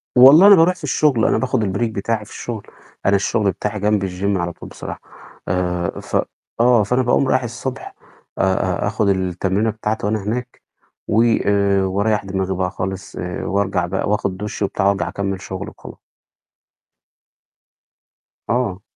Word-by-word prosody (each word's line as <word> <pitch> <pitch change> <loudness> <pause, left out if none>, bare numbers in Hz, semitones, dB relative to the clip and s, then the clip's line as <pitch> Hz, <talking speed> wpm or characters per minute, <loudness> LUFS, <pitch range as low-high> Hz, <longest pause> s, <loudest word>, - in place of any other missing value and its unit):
والله 140 +9 +9
أنا 205 - +10
بارُوح 175 +1 +4
في 180 - -17
الشغل، 145 -4 +2
أنا - - +3
باخد 130 -3 0
الbreak 105 +3 -1
بتاعي 110 +1 -2
في - - -16
الشغل، 115 -4 -6 0.4
أنا 100 - +4
الشغل 100 +1 +1
بتاعي 105 +4 -4
جنب 105 -1 +1
الgym 95 +2 -1
على 85 0 -2
طول - - -11
بصراحة، - - -8 0.5
آآ، 90 -1 -1
ف - - -6 0.4
آه. 120 -2 +5
فأنا 125 +6 +1
باقوم 130 +2 +2
رايح 130 - +2
الصبح 120 +2 -6 0.4
آآ، - - +2
أ 95 -1 0
أ - - 0
آخد 105 -1 0
التمرينة 95 +3 0
بتاعتي 110 -1 -3
وأنا 105 -1 -1
هناك 120 +4 -4 0.5
و - - -1 0.8
واريّح 105 0 +1
دماغي 95 -1 -2
بقى 90 0 -1
خالص، 95 +1 -5 0.3
وارجع 95 -2 0
بقى 95 +3 -2
وآخد 100 -3 -1
دُش 105 +2 -6
وبتاع 100 0 0
وأرجَع 100 0 +1
أكمِّل 95 -1 -3
شغل 95 0 -6
وخلا - - -12 2.5
آه. 105 -6 0
105 Hz, 155 wpm, -20 LUFS, 95-115 Hz, 2.5 s, أنا